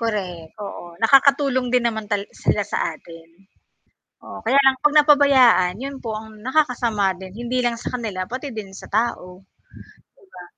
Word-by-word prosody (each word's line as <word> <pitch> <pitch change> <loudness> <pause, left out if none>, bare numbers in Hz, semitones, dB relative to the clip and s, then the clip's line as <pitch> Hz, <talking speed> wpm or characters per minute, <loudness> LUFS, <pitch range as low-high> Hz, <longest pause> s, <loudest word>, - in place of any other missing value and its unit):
Correct, 185 -8 -4
oo, 175 -1 -11
nakakatulong 275 +1 +4
din 250 -1 +2
naman 220 -2 -2
tal 205 -1 -1
sila 205 - -1
sa - - -3 0.2
atin. 165 0 -15 1.0
Oo, - - -9
kaya 255 +5 +3
lang 265 -1 +4
'pag 295 0 +2
napabayaan, 275 - +5
'yun 275 0 -6
po 220 -2 -4
ang 215 0 -11
nakakasama 240 -6 0
din, 190 -1 -10
hindi 240 +2 -3
lang 240 -1 0
sa 230 - -6
kanila 210 -6 -4
pati 255 +8 -6
din 200 -3 -7
sa 195 - -11
tao. 195 -4 -3
'Di - - -47 0.8
ba? 180 - -11
225 Hz, 165 wpm, -21 LUFS, 195-260 Hz, 1.0 s, napabayaan